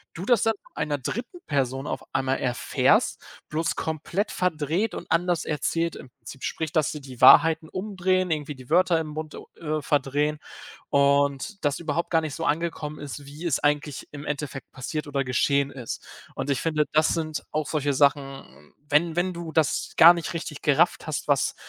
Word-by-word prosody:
du 175 Hz, -, -5 dB
das 240 Hz, -2 st, +4 dB
dann 225 Hz, 0 st, +3 dB
von -, -, -24 dB
einer 150 Hz, -1 st, -1 dB
3. 245 Hz, -, -5 dB
Person 135 Hz, -1 st, -1 dB
auf -, -, -4 dB
einmal 135 Hz, 0 st, +1 dB
erfährst, 125 Hz, -2 st, +1 dB, 0.3 s
bloß 160 Hz, +2 st, -1 dB
komplett 160 Hz, +6 st, -2 dB
verdreht 175 Hz, +4 st, 0 dB
und -, -, -7 dB
anders 175 Hz, 0 st, +2 dB
erzählt 165 Hz, +2 st, -1 dB
im 130 Hz, -, -11 dB
Prinzip. 130 Hz, +2 st, -12 dB
Sprich, 160 Hz, -1 st, -3 dB
dass 155 Hz, -4 st, +1 dB
sie 150 Hz, -, -7 dB
die 130 Hz, -3 st, -11 dB
Wahrheiten 160 Hz, +4 st, +7 dB
umdrehen, 185 Hz, -2 st, 0 dB
irgendwie 150 Hz, -2 st, -2 dB
die 130 Hz, -1 st, -14 dB
Wörter 175 Hz, 0 st, +4 dB
im 160 Hz, -, -4 dB
Mund 155 Hz, 0 st, -6 dB
u -, -, -9 dB
äh, 155 Hz, -2 st, -2 dB
verdrehen. 145 Hz, +2 st, 0 dB, 0.5 s
Und 140 Hz, +7 st, +2 dB
das 145 Hz, -1 st, +1 dB
überhaupt 165 Hz, 0 st, -2 dB
gar 165 Hz, -1 st, +4 dB
nicht 155 Hz, -2 st, -4 dB
so 165 Hz, -, -4 dB
angekommen 155 Hz, -1 st, -2 dB
ist, 145 Hz, 0 st, -7 dB
wie 145 Hz, +4 st, -10 dB
es 155 Hz, -, +1 dB
eigentlich 145 Hz, -1 st, -1 dB
im 145 Hz, 0 st, -8 dB
Endeffekt 145 Hz, -2 st, -5 dB
passiert 150 Hz, +4 st, -4 dB
oder 140 Hz, -1 st, -1 dB
geschehen 140 Hz, +2 st, +1 dB
ist. 125 Hz, -5 st, -7 dB, 0.3 s
Und -, -, -4 dB
ich 135 Hz, -, +1 dB
finde, 155 Hz, -2 st, +1 dB
das 155 Hz, +1 st, +4 dB
sind 155 Hz, -2 st, -2 dB
auch 155 Hz, -1 st, -1 dB
solche 145 Hz, -2 st, 0 dB
Sachen, 135 Hz, -, 0 dB, 0.2 s
wenn 160 Hz, +3 st, +2 dB
wenn 180 Hz, +1 st, +1 dB
du 170 Hz, -2 st, -6 dB
das 155 Hz, -3 st, +1 dB
gar 170 Hz, +2 st, +10 dB
nicht 170 Hz, -2 st, -4 dB
richtig 155 Hz, -3 st, -5 dB
gerafft 155 Hz, +4 st, +2 dB
hast, 155 Hz, -1 st, -3 dB
was 140 Hz, -3 st, +2 dB
150 Hz, 185 wpm, -25 LUFS, 140-165 Hz, 0.5 s, gar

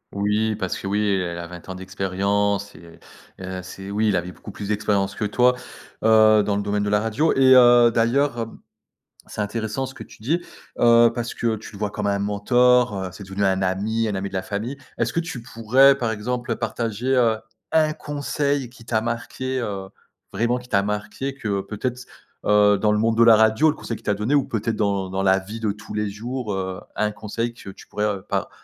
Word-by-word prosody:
Oui, 105 Hz, +2 st, +1 dB
parce 95 Hz, -3 st, -3 dB
que, 95 Hz, -, -6 dB
oui, 105 Hz, +2 st, 0 dB
elle 90 Hz, -4 st, -1 dB
a 85 Hz, -, -5 dB
20 85 Hz, 0 st, -11 dB
ans 95 Hz, -, -5 dB
d'expérience 100 Hz, +2 st, -1 dB
et 85 Hz, +1 st, -15 dB, 0.4 s
et 95 Hz, 0 st, -6 dB
c'est 95 Hz, +2 st, -9 dB
oui, 110 Hz, +2 st, +1 dB
il 105 Hz, -, +2 dB
avait 90 Hz, +1 st, -2 dB
beaucoup 105 Hz, -, -12 dB
plus 100 Hz, +1 st, -7 dB
d'expérience 100 Hz, -2 st, 0 dB
que 110 Hz, -, -5 dB
toi, 125 Hz, +4 st, +3 dB, 0.5 s
heu, 110 Hz, -1 st, +6 dB
dans 100 Hz, -, 0 dB
le 100 Hz, -, -1 dB
domaine 105 Hz, 0 st, -1 dB
de 105 Hz, -, -1 dB
la 105 Hz, 0 st, +3 dB
radio 115 Hz, +9 st, +1 dB
et 130 Hz, -1 st, +6 dB
heu, 120 Hz, -1 st, +7 dB
d'ailleurs, 120 Hz, +3 st, +1 dB
hem, 115 Hz, 0 st, -5 dB, 0.7 s
c'est -, -, -5 dB
intéressant 110 Hz, +4 st, -2 dB
ce 130 Hz, -, -9 dB
que 130 Hz, -, -13 dB
tu 110 Hz, -, -16 dB
dis, 170 Hz, +7 st, 0 dB, 0.4 s
heu, 115 Hz, 0 st, +6 dB
parce 120 Hz, -1 st, -4 dB
que 115 Hz, -2 st, 0 dB
tu 110 Hz, 0 st, -11 dB
le -, -, -9 dB
vois 105 Hz, 0 st, -2 dB
comme 105 Hz, -1 st, -3 dB
un 100 Hz, 0 st, +1 dB
mentor, 120 Hz, +4 st, +3 dB
heu, -, -, -5 dB
c'est 100 Hz, -, -10 dB
devenu 95 Hz, +1 st, -2 dB
un 95 Hz, 0 st, +1 dB
ami, 105 Hz, +5 st, 0 dB
un 105 Hz, -, -2 dB
ami 95 Hz, +1 st, -3 dB
de -, -, -19 dB
la 95 Hz, -, -1 dB
famille. 110 Hz, +8 st, -4 dB, 0.2 s
Est-ce -, -, -1 dB
que -, -, +1 dB
tu 165 Hz, -8 st, -5 dB
pourrais, 130 Hz, +4 st, +4 dB
par 120 Hz, -4 st, -2 dB
exemple, 120 Hz, +3 st, -3 dB
heu, -, -, +1 dB
partager, 120 Hz, +4 st, -2 dB
heu, 115 Hz, -3 st, +3 dB, 0.3 s
1 155 Hz, -1 st, +3 dB
conseil 145 Hz, -3 st, -2 dB
qui 115 Hz, -, -15 dB
t'a 110 Hz, -1 st, 0 dB
marqué, 120 Hz, +3 st, -3 dB
heu, 95 Hz, -3 st, -4 dB, 0.4 s
vraiment 120 Hz, +2 st, +1 dB
qui 125 Hz, 0 st, -11 dB
t'a 100 Hz, -3 st, +3 dB
marqué 105 Hz, +7 st, -4 dB
que 100 Hz, -6 st, -2 dB
peut-être 110 Hz, +5 st, -4 dB
c 125 Hz, -, -12 dB, 0.4 s
heu, 105 Hz, -1 st, +5 dB
dans 105 Hz, -, +2 dB
le 105 Hz, -, +2 dB
monde 115 Hz, +1 st, +1 dB
de 115 Hz, -, +5 dB
la 115 Hz, -1 st, +8 dB
radio, 110 Hz, +7 st, +4 dB
le 155 Hz, -, -1 dB
conseil 115 Hz, -, -5 dB
qu'il -, -, -14 dB
t'a 105 Hz, -, +1 dB
donné 105 Hz, +7 st, -1 dB
ou 145 Hz, -2 st, +4 dB
peut-être 110 Hz, 0 st, -2 dB
dans 100 Hz, -3 st, -1 dB
dans 95 Hz, -, -1 dB
la 95 Hz, 0 st, +4 dB
vie 105 Hz, +4 st, -7 dB
de 110 Hz, -2 st, 0 dB
tous 105 Hz, +2 st, -10 dB
les 105 Hz, -1 st, -1 dB
jours, 120 Hz, +3 st, -5 dB
heu, 95 Hz, -1 st, -4 dB
un 105 Hz, 0 st, 0 dB
conseil 110 Hz, +3 st, -4 dB
que 115 Hz, -, -11 dB
tu 95 Hz, -, -12 dB
pourrais, 105 Hz, +1 st, -2 dB
heu, 100 Hz, -3 st, -2 dB
par -, -, -2 dB
105 Hz, 225 wpm, -23 LUFS, 100-120 Hz, 0.7 s, la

